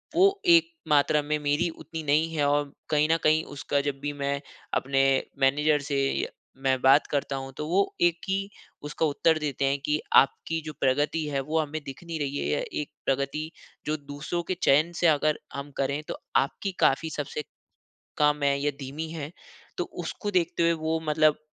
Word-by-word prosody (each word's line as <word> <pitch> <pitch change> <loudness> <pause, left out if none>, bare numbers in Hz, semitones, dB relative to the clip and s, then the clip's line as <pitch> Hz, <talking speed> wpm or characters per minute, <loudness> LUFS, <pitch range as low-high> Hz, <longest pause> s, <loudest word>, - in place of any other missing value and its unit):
वो 390 +2 +4
एक 335 -1 +6 0.2
मात्रा 150 0 +4
में 150 +1 -1
मेरी 145 +4 +1
उतनी 160 0 -7
नहीं 155 +3 +2
है 145 -2 +1
और 145 0 +1 0.2
कहीं 150 0 +3
न 165 - +4
कहीं, 155 +1 +4
उसका 140 0 -2
जब 140 -1 -3
भी 145 +1 -3
मैं 140 0 -2 0.3
अपने 135 +1 +1 0.4
मैनेजर 145 +3 +3
से 140 - +1 0.2
य - - -2 0.4
मैं 130 -1 +2
बात 135 +3 +5
करता 140 -1 -1
हूँ, 135 0 -5
तो 150 - -3
वो 195 +4 +1
एक 175 -1 +4
ही 195 +1 -1 0.3
उसका 150 +2 -1
उत्तर 160 +2 +2
देते 140 -2 -1
हैं 140 +1 +2
कि, 150 +1 +1 0.2
"आपकी 165 +4 +4
जो 155 - -5
प्रगति 145 +4 +1
है, 140 -2 -1
वो 155 +4 -1
हमें 155 0 -2
दिख 135 +6 -8
नहीं 165 -2 -5
रही 145 -1 -2
है - - -2
या - - +1 0.2
एक 150 - -7 0.2
प्रगति, 140 +4 -1 0.3
जो 155 - 0
दूसरों 145 +4 -4
के - - +2
चयन 155 +5 +4
से 175 - +4
अगर 155 0 +2
हम 140 +1 -6
करें, 140 +2 0
तो - - -4 0.2
आपकी 190 +8 +1
काफ़ी 160 +4 +3
सबसे 150 0 -4 0.8
कम 150 0 +3
है 140 0 +3
या 145 - +2
धीमी 145 +4 -5
है।" 155 -2 -5 0.5
तो - - +1 0.2
उसको 205 - -4
देखते 170 -2 +1
हुए, 170 - +4
वो 160 0 -1
मतलब 155 0 +4
150 Hz, 190 wpm, -27 LUFS, 140-160 Hz, 0.8 s, एक